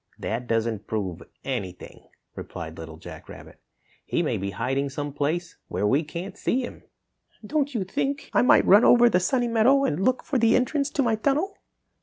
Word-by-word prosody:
"That 120 Hz, +2 st, -4 dB
doesn't 115 Hz, -2 st, -1 dB
prove 95 Hz, -6 st, -3 dB, 0.2 s
anything," 90 Hz, -3 st, -6 dB, 0.3 s
replied -, -, -7 dB
Little 80 Hz, -1 st, -8 dB
Jack -, -, -11 dB
Rabbit. -, -, -12 dB, 0.4 s
"He -, -, -1 dB
may -, -, 0 dB
be 100 Hz, +1 st, -3 dB
hiding 135 Hz, +6 st, -1 dB
some 145 Hz, +1 st, -5 dB
place 165 Hz, +5 st, -2 dB
where -, -, -2 dB
we 135 Hz, +9 st, +2 dB
can't 170 Hz, +6 st, -7 dB
see 260 Hz, -, 0 dB
him." -, -, -10 dB, 0.6 s
"Don't 285 Hz, +1 st, -1 dB
you 210 Hz, -, 0 dB
think 275 Hz, +9 st, -2 dB
I -, -, +4 dB
might 250 Hz, -, +5 dB
run 205 Hz, +4 st, +7 dB
over 240 Hz, 0 st, +6 dB
the 180 Hz, -, +3 dB
Sunny 245 Hz, +6 st, +1 dB
Meadow 235 Hz, +5 st, +4 dB
and 170 Hz, -, -1 dB
look 255 Hz, +3 st, +1 dB
for 270 Hz, -, -1 dB
the 230 Hz, 0 st, +4 dB
entrance 280 Hz, +3 st, +1 dB
to 285 Hz, -, 0 dB
my 235 Hz, -2 st, +2 dB
tunnel?" 290 Hz, -, 0 dB
190 Hz, 185 wpm, -25 LUFS, -, 0.6 s, run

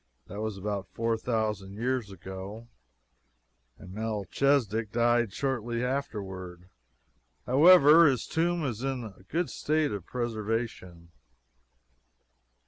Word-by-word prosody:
That 100 Hz, +3 st, -7 dB
was 110 Hz, -2 st, -3 dB
about 100 Hz, 0 st, -3 dB
four 115 Hz, 0 st, -1 dB
thousand 110 Hz, -4 st, -2 dB
years 120 Hz, -1 st, -1 dB
ago, 95 Hz, +4 st, -8 dB, 1.1 s
and 90 Hz, -, -12 dB
Melchisedek 110 Hz, +1 st, 0 dB
died 120 Hz, -1 st, +2 dB
shortly 120 Hz, -1 st, -2 dB
afterward. 95 Hz, -9 st, -4 dB, 0.8 s
However, 160 Hz, +3 st, +7 dB
his 130 Hz, -5 st, +1 dB
tomb 170 Hz, 0 st, 0 dB
is 120 Hz, -4 st, -3 dB
in 135 Hz, -2 st, -2 dB
a 100 Hz, -4 st, -10 dB
good 170 Hz, +1 st, -1 dB
state 155 Hz, -1 st, 0 dB
of 100 Hz, -4 st, -6 dB
preservation. 110 Hz, -7 st, -4 dB
115 Hz, 105 wpm, -28 LUFS, 100-130 Hz, 1.1 s, However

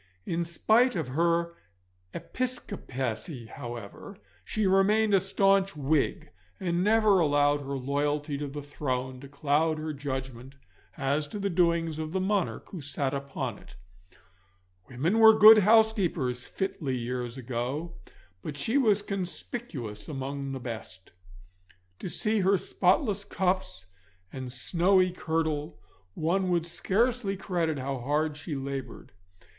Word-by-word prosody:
In 170 Hz, 0 st, -1 dB
spite 225 Hz, +9 st, +3 dB
of 160 Hz, -7 st, -2 dB
her 170 Hz, +4 st, +1 dB, 0.6 s
Episcopacy, 135 Hz, -, -4 dB
however, 120 Hz, -, -8 dB, 0.3 s
she 215 Hz, -1 st, -1 dB
remained 205 Hz, +3 st, +3 dB
a 195 Hz, -, +6 dB
staunch 195 Hz, 0 st, +2 dB
Whig, 145 Hz, 0 st, 0 dB, 0.3 s
and 175 Hz, -1 st, 0 dB
never 215 Hz, -2 st, +4 dB
allowed 145 Hz, -2 st, +3 dB
her 140 Hz, 0 st, -4 dB
loyalty 145 Hz, +2 st, -1 dB
to 145 Hz, -, -3 dB
the 145 Hz, +1 st, -7 dB
throne 130 Hz, -3 st, -3 dB
to 140 Hz, -, -10 dB
cloud 150 Hz, +3 st, +1 dB
her 155 Hz, 0 st, -4 dB
judgment 130 Hz, -2 st, -6 dB, 0.4 s
as 145 Hz, +2 st, 0 dB
to 210 Hz, -, -6 dB
the 200 Hz, -1 st, -1 dB
doings 170 Hz, -2 st, +1 dB
of 155 Hz, +1 st, -4 dB
the 190 Hz, -, +1 dB
monarch 195 Hz, 0 st, -1 dB
who 180 Hz, -, -7 dB
sat 140 Hz, -1 st, -2 dB
upon 135 Hz, -5 st, -4 dB
it. -, -, -16 dB, 1.1 s
Women 155 Hz, -, 0 dB
were 220 Hz, -1 st, +8 dB
good 215 Hz, +1 st, +10 dB
housekeepers 195 Hz, -, +2 dB
fitly 150 Hz, -9 st, -3 dB
years 120 Hz, 0 st, -4 dB
ago, 130 Hz, +7 st, -4 dB, 0.5 s
but 150 Hz, -2 st, -6 dB
she 225 Hz, -, +1 dB
was 210 Hz, -5 st, +3 dB
conspicuous 180 Hz, -, -5 dB
among 140 Hz, -1 st, -4 dB
the 135 Hz, -, -4 dB
best. 110 Hz, -6 st, -8 dB, 0.9 s
To -, -, -5 dB
see 215 Hz, +3 st, 0 dB
her 195 Hz, +1 st, +3 dB
spotless 200 Hz, -, +1 dB
cuffs 185 Hz, -, -1 dB, 0.5 s
and 130 Hz, -2 st, -6 dB
snowy 185 Hz, +8 st, +2 dB
kirtle 160 Hz, -, -2 dB, 0.4 s
one 180 Hz, +4 st, 0 dB
would 170 Hz, -2 st, +1 dB
scarce 230 Hz, +8 st, 0 dB
credit 170 Hz, -5 st, -1 dB
how 135 Hz, 0 st, -3 dB
hard 150 Hz, +4 st, 0 dB
she 150 Hz, +1 st, -6 dB
laboured. 135 Hz, 0 st, -6 dB
155 Hz, 130 wpm, -28 LUFS, 135-195 Hz, 1.1 s, good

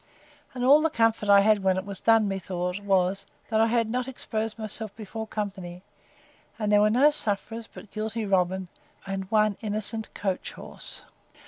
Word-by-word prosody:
And 250 Hz, 0 st, -1 dB
all 285 Hz, +4 st, +7 dB
the 320 Hz, -, +2 dB
comfort 225 Hz, -6 st, +1 dB
I 200 Hz, 0 st, +8 dB
had 210 Hz, 0 st, +4 dB
when 190 Hz, -1 st, +2 dB
it 190 Hz, -, -3 dB
was 200 Hz, -1 st, -4 dB
done, 225 Hz, -2 st, +4 dB
methought, 180 Hz, -1 st, -3 dB
was, 195 Hz, -1 st, +1 dB, 0.2 s
that 220 Hz, -1 st, +2 dB
I 225 Hz, -, +4 dB
had 230 Hz, -1 st, +1 dB
not 250 Hz, +3 st, -2 dB
exposed 225 Hz, -4 st, -4 dB
myself 215 Hz, -1 st, -6 dB
before 220 Hz, +1 st, -6 dB
company; 190 Hz, -4 st, -5 dB, 0.7 s
and 210 Hz, -2 st, -1 dB
there 205 Hz, 0 st, +6 dB
were 210 Hz, -, +5 dB
no 265 Hz, +7 st, +5 dB
sufferers, 225 Hz, -3 st, -3 dB
but 210 Hz, -, -12 dB
guilty 220 Hz, +1 st, -3 dB
Robin, 190 Hz, -1 st, +1 dB, 0.4 s
and 195 Hz, -1 st, -4 dB
one 215 Hz, -2 st, +3 dB
innocent 215 Hz, +1 st, -2 dB
coach 190 Hz, -2 st, -3 dB
horse. -, -, -9 dB
210 Hz, 175 wpm, -27 LUFS, 195-225 Hz, 0.7 s, I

